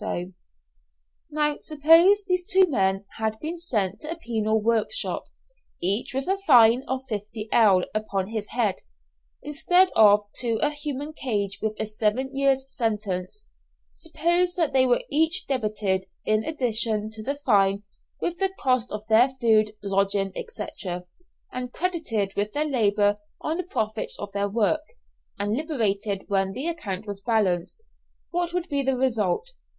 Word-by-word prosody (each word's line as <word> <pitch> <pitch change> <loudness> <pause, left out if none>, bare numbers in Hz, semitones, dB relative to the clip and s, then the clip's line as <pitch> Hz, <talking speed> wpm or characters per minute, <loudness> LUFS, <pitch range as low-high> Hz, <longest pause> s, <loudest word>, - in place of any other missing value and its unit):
Now 300 -1 0
suppose 330 +7 +5
these 365 -1 0
two 380 0 +5
men 195 - 0
had 220 -1 -1
been 330 +3 -5
sent 210 - -1
to 305 - -7
a 330 - -2
penal 220 -7 -1
workshop, 230 - +1 0.5
each 200 +7 +1
with 270 0 -2
a 385 +1 0
fine 240 -3 +7
of 260 0 -2
50_l._ 210 -3 +1
upon 200 -3 -2
his 215 -2 -4
head, 225 -6 0 0.7
instead 355 +6 +3
of 210 -1 +6 0.2
to 235 -2 +1
a 295 - +1
human 295 0 -5
cage 205 -9 -2
with 220 -1 -2
a - - 0
seven 215 +5 -1
years' 270 -1 +2
sentence; 210 - -3 0.5
suppose 345 +2 0
that 330 -6 0
they 260 -1 +4
were 245 - +3
each 320 +3 +2
debited, 210 -7 -1 0.2
in 215 0 +1
addition 225 -7 0
to 220 0 -5
the 275 +6 -2
fine, 195 0 +3 0.4
with 345 0 -3
the 385 -1 +2
cost 255 -3 +1
of 210 0 -5
their 225 +4 +5
food, 215 -2 +3
lodging, 195 0 0 0.2
&c., 465 - -5 0.9
and 250 -1 -4
credited 310 - -2
with 205 +1 -2
their 300 +1 0
labour 205 -7 +2 0.2
on 315 +2 -2
the 365 - -2
profits 220 - -3
on 205 - -6
their 200 0 -1
work, 230 +8 +1 0.6
and 205 0 -1
liberated 215 - -1
when 195 -1 0
the 260 +7 -4
account 215 - -4
was 200 -2 -6
balanced, 200 - 0 0.5
what 350 0 -1
would 360 0 -2
be 285 -4 0
the 270 -1 0
result? 255 - 0
230 Hz, 150 wpm, -25 LUFS, 205-300 Hz, 0.9 s, fine